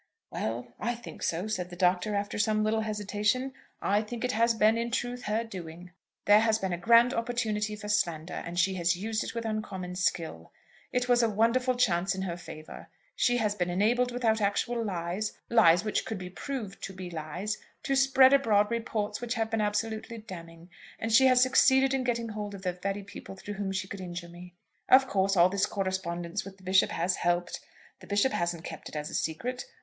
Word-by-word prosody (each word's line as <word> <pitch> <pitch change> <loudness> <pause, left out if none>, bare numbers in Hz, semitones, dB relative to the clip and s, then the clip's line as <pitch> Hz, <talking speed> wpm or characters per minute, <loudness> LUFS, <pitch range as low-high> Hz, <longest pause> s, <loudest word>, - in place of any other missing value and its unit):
"Well, 120 +2 -4
I 240 +2 -1
think 235 - -11
so," 170 +4 -1
said 185 -5 -3
the 175 - -9
Doctor, 180 +3 +1
after 205 +1 -2
some 215 0 +2
little 220 +1 +1
hesitation. 210 +4 -1 0.3
"I 205 +2 +2
think 225 +2 -6
it 250 - +1
has 230 0 +2
been, 220 0 +4
in 235 +1 -1
truth, 245 +1 -3
her 215 +2 0
doing. 180 -4 -9 0.3
There 205 +1 +7
has 220 0 +3
been 190 -4 -2
a - - -1
grand 235 +6 +5
opportunity 220 -3 -1
for 210 0 -8
slander, 175 -5 0
and 170 +1 -6
she 190 +2 +3
has 175 -1 +1
used 215 +4 -2
it - - -6
with 230 -1 -3
uncommon 195 -5 -4
skill. 165 - -2 0.4
It 250 0 0
was 245 -1 +4
a 230 - +3
wonderful 230 +4 +2
chance 190 -6 +2
in 190 - -3
her 175 -3 -3
favour. 155 -3 -10 0.3
She 245 0 +2
has 215 -3 +1
been 180 -3 -1
enabled 235 +7 +2
without 225 -3 +1
actual 230 +4 0
lies, 185 +1 -3
lies 180 -7 +6
which 215 - 0
could 220 - -4
be 180 -1 -7
proved 210 - -6
to 195 - -8
be 185 -1 -7
lies, 175 +7 -4 0.2
to 275 - 0
spread 270 0 +6
abroad 215 -6 +3
reports 215 -2 -2
which 240 0 -2
have 225 0 -1
been 225 -1 +1
absolutely 220 +2 -2
damning. 170 -5 -11 0.3
And 225 +1 -2
she 265 +3 +7
has 255 -1 +6
succeeded 265 +1 +4
in 265 -1 0
getting 235 -2 -1
hold 210 -1 -5
of 190 - -11
the 180 -1 -1
very 195 +3 -4
people 195 -1 -10
through 205 +2 -7
whom 195 -1 -3
she 190 0 -3
could 195 0 -7
injure 175 -1 -6
me. 175 +1 -12 0.3
Of 265 +1 +7
course 195 -2 +1
all 175 +1 +6
this 195 +1 +1
correspondence 190 -1 -3
with 195 0 -11
the 190 - -20
Bishop 190 +1 +4
has 175 +3 0
helped. 175 0 0 0.4
The - - -14
Bishop 205 +6 +2
hasn't 170 -1 -1
kept - - -8
it - - -12
as 150 0 -4
a - - -10
secret. 240 - -2
205 Hz, 205 wpm, -29 LUFS, 180-230 Hz, 0.4 s, There